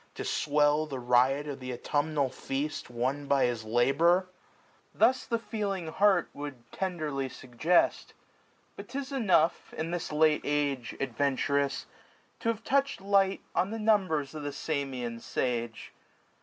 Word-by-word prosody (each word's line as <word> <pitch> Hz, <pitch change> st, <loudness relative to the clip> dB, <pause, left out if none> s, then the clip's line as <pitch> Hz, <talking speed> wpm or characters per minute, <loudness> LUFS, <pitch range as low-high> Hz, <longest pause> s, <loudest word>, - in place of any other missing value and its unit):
To -, -, -5 dB
swell 150 Hz, +1 st, +2 dB
the 135 Hz, -3 st, -5 dB
riot 125 Hz, +4 st, +3 dB
of 140 Hz, -2 st, -5 dB
th' 130 Hz, 0 st, -5 dB
autumnal 145 Hz, +2 st, 0 dB
feast. 135 Hz, +2 st, -4 dB
Won 130 Hz, +4 st, -2 dB
by 140 Hz, -1 st, +3 dB
his 120 Hz, -2 st, -1 dB
labour? 140 Hz, +11 st, +3 dB, 0.7 s
Thus 260 Hz, -, +3 dB
the 230 Hz, -, +1 dB
feeling 205 Hz, -6 st, -3 dB
heart 200 Hz, +4 st, +3 dB
Would 145 Hz, -1 st, -6 dB, 0.2 s
tenderly 155 Hz, -8 st, -2 dB
suggest: 130 Hz, +9 st, +1 dB, 0.6 s
But -, -, -10 dB
'tis 275 Hz, 0 st, -5 dB
enough, 195 Hz, -, +2 dB
370 155 Hz, -, -1 dB
In 165 Hz, -, -5 dB
this 175 Hz, -3 st, -3 dB
late 155 Hz, 0 st, +3 dB
age, 145 Hz, -4 st, -1 dB
adventurous, 140 Hz, +1 st, 0 dB, 0.5 s
to 230 Hz, -, -1 dB
have 225 Hz, -1 st, -2 dB
touch'd 275 Hz, -3 st, +1 dB
Light 195 Hz, -1 st, +2 dB
on 185 Hz, -, +1 dB
the 225 Hz, -, -4 dB
mmibers 185 Hz, -10 st, +1 dB
of 155 Hz, -, -6 dB
the 145 Hz, -, -3 dB
Samian 130 Hz, -7 st, -3 dB
sage. 120 Hz, -3 st, -3 dB
145 Hz, 140 wpm, -29 LUFS, 135-185 Hz, 0.7 s, riot